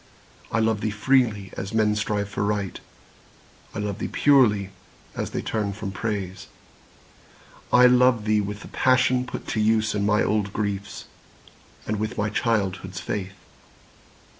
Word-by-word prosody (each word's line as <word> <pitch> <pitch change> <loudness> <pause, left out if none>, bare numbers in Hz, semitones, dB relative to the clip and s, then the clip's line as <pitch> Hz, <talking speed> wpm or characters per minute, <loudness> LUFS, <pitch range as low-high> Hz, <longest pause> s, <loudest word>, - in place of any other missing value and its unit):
I - - 0
love 110 -1 +1
thee 110 - 0
freely, 110 -2 +1
as 100 +3 -5
men 105 -1 +3
strive 105 -1 -1
for 100 0 -3
Right; 100 -3 -2 1.0
I - - -4
love 105 -2 -3
thee - - -2
purely, 110 -9 +3 0.4
as - - -3
they - - -4
turn 105 -3 -2
from 100 -1 -5
Praise. 95 -2 -4 1.2
I 125 0 +7
love 125 -3 +4
thee 105 -1 +3
with 105 +1 -5
the - - -10
passion 130 0 +2
put - - -7
to 110 - -1
use 110 0 +2
In 105 -1 -1
my 105 +1 +3
old 105 -2 0
griefs, 100 -2 -3 0.8
and 105 -1 -2
with 110 +2 -3
my 105 0 0
childhood's 95 -5 -1
faith. 95 -1 -4
105 Hz, 150 wpm, -24 LUFS, 100-110 Hz, 1.2 s, I